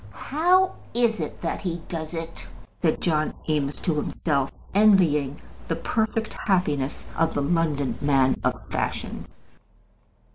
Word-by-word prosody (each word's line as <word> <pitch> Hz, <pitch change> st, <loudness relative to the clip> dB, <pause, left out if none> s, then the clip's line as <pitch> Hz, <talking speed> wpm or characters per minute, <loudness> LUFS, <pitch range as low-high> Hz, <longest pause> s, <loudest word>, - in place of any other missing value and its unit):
"How 365 Hz, +6 st, +4 dB, 0.2 s
is 235 Hz, -2 st, +2 dB
it -, -, -5 dB
that -, -, -2 dB
he 175 Hz, -3 st, -2 dB
does 160 Hz, 0 st, -4 dB
it?" 165 Hz, 0 st, -6 dB, 0.3 s
said 160 Hz, -2 st, +1 dB
John 155 Hz, -3 st, +1 dB
Eames 150 Hz, -2 st, 0 dB
to 170 Hz, -, +1 dB
himself, 140 Hz, -2 st, 0 dB, 0.2 s
envying 170 Hz, -9 st, +4 dB, 0.3 s
the -, -, 0 dB
perfect 220 Hz, -1 st, -1 dB
happiness 150 Hz, -9 st, 0 dB
of 165 Hz, 0 st, +1 dB
the 145 Hz, -, +1 dB
London 150 Hz, -2 st, 0 dB
man 135 Hz, -2 st, +3 dB
of -, -, -1 dB
fashion. -, -, -3 dB
165 Hz, 130 wpm, -25 LUFS, 145-205 Hz, 0.3 s, How